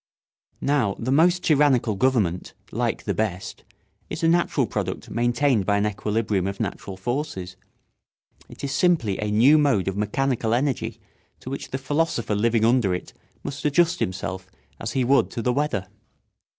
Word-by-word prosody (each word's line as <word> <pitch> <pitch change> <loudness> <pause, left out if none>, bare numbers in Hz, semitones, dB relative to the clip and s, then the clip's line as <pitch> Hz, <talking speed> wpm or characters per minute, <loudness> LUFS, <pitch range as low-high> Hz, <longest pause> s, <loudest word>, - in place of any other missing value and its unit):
Now 130 -9 +2
the 125 +3 -2
most 175 +5 +4
tyrannical 140 -7 +3
government, 100 -6 0 0.2
like - - -1
the - - -1
best, 100 -4 -3 0.5
is - - -5
a - - +4
natural 165 -5 +2
product 95 -4 -4
maintained 120 -2 +1
by 100 -1 +3
an 100 - +1
equilibrium 105 -2 -1
of 100 0 -4
natural 95 -1 -4
forces. 95 -4 -4 0.9
It - - -12
is 140 - -2
simply 145 - +2
a 105 - -1
new 125 +9 +5
mode 135 -11 +2
of 95 - -1
mechanical 115 +2 0
energy 135 +1 -1 0.4
to 130 - -7
which 140 - -5
the 130 - -3
philosopher 135 -5 -1
living 110 +1 +2
under 115 -6 +3
it 90 - -8 0.3
must 140 +1 -6
adjust 165 +3 +2
himself 95 0 -3 0.3
as - - -4
he 130 - +1
would 135 +3 +3
to 120 - -4
the 125 - +1
weather. 130 -9 -1
120 Hz, 160 wpm, -24 LUFS, 100-140 Hz, 0.9 s, new